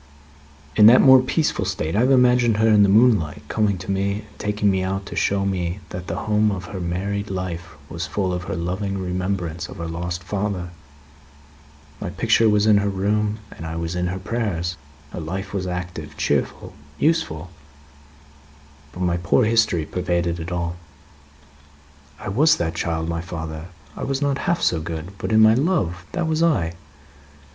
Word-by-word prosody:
"In 105 - +8
that 120 +3 +8
more 130 -1 +8
peaceful 140 -3 0
state, 95 -3 -2
I - - +3
have 125 +3 +3
imagined 125 -3 +4
her, 110 +1 +3
in 105 -2 +5
the 100 - +5
moonlight, 105 - +3
coming 105 -3 +1
to 90 +2 -5
me 100 +1 0 0.2
and - - -23
taking 105 -1 +1
me 95 -1 0
out 95 +1 -2
to - - -8
show 100 0 +1
me 90 -1 -2
that 90 0 -7
the - - -3
home 105 0 +3
of 95 -3 -4
her 95 +1 -6
married 100 +4 -3
life 90 -3 -5
was 85 +3 -5
full 95 -3 -1
of 90 0 -4
her - - -3
loving 95 +3 -2
remembrance 90 -2 -3
of - - -10
her 85 - -4
lost 85 +2 -4
father. 95 -2 -3 1.3
My - - -4
picture 115 -1 +3
was 105 0 +3
in 105 -2 +6
her 100 0 0
room, 105 +2 0
and - - -10
I 80 0 -5
was 85 +1 -3
in 90 0 0
her 90 +1 -3
prayers. 95 -5 -2 0.4
Her - - -6
life 95 +5 -5
was 95 -2 -2
active, 90 -4 -5
cheerful, - - -1 0.2
useful; 120 - 0 1.4
but 90 - -7
my 90 -1 +1
poor 90 +8 +2
history 110 -7 +2
pervaded 85 0 -1
it 80 +2 -6
all." 85 0 -2 1.4
"I - - -8
was 150 +10 +4
that 80 -1 -1
child, 80 -1 -2
my 85 0 -2
father, 80 -1 -6 0.3
I - - -6
was 135 -1 -1
not 140 -1 0
half 175 - +1
so 80 -2 +2
good, 80 +2 -5
but - - -3
in 110 0 +5
my 110 0 +7
love 115 - 0
that 175 -2 -1
was 160 0 0
I." 145 - +2
95 Hz, 180 wpm, -22 LUFS, 85-105 Hz, 1.4 s, In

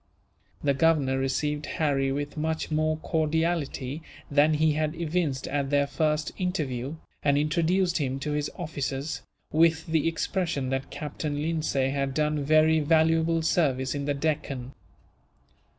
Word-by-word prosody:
The 140 -1 +3
Governor 140 -3 +2
received 145 +3 -1
Harry 135 -3 +1
with 145 +1 -3
much 160 +1 -2
more 155 0 +1
cordiality 160 -3 -1 0.3
than 150 +2 +4
he 155 +1 +3
had 155 +1 -1
evinced 160 -5 -1
at 140 0 -1
their 145 0 +3
first 150 +1 0
interview, 150 -7 -2 0.3
and 140 -1 +3
introduced 170 +4 +1
him 135 -2 -1
to 150 - -2
his 150 0 -1
officers, 145 -4 -3 0.3
with 160 +1 +3
the 160 -2 +1
expression 165 -5 -1
that 135 0 -2
Captain 150 0 -4
Lindsay 150 -5 0
had 140 -1 -1
done 150 -1 +1
very 155 +2 +4
valuable 160 +1 +3
service 135 -6 +1
in 140 -1 -3
the 145 0 0
Deccan. 140 -4 -2
150 Hz, 135 wpm, -27 LUFS, 140-160 Hz, 0.3 s, than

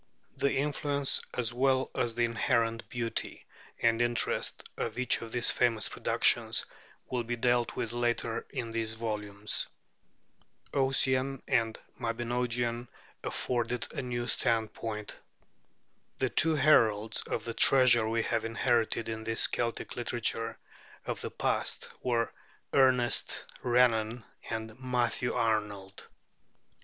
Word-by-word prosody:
The 140 - +1
influence, 145 0 0
as 120 -1 -1
well 130 +1 +2
as 115 -1 0
the 120 0 +2
inherent 115 -1 0
beauty 120 -2 -3 0.3
and 115 0 +2
interest, 120 0 0
of - - -4
each 125 0 +2
of 115 -1 -8
these 120 0 +2
famous 115 -3 +1
productions - - +1 0.5
will 125 -1 0
be 120 +1 -3
dealt 120 0 +1
with 115 - -3
later 120 -1 -1
in 115 -1 -4
these 115 -1 -1
volumes. 105 -2 -2 1.1
'Ossian' 135 0 +1
and 115 -1 +1
the - - -18
'Mabinogion' 120 +1 -1 0.4
afforded 120 -1 -2
a - - -3
new 120 -1 -3
standpoint. 110 -2 -1 1.0
The 130 - 0
two 160 0 +4
heralds 115 -7 +3
of - - -3
the 115 - -3
treasure 125 -4 +6
we 115 0 0
have - - -1
inherited 115 0 0
in 110 -1 -4
this 115 0 +3
Celtic 115 -1 -2
literature 115 -1 -2 0.5
of - - -4
the - - -4
past - - -1
were 115 -2 0 0.4
Ernest 130 -2 +3 0.2
Renan 120 -2 +2 0.3
and 110 +1 -5
Matthew 125 -2 0
Arnold. 105 -4 -2
120 Hz, 120 wpm, -30 LUFS, 115-125 Hz, 1.1 s, treasure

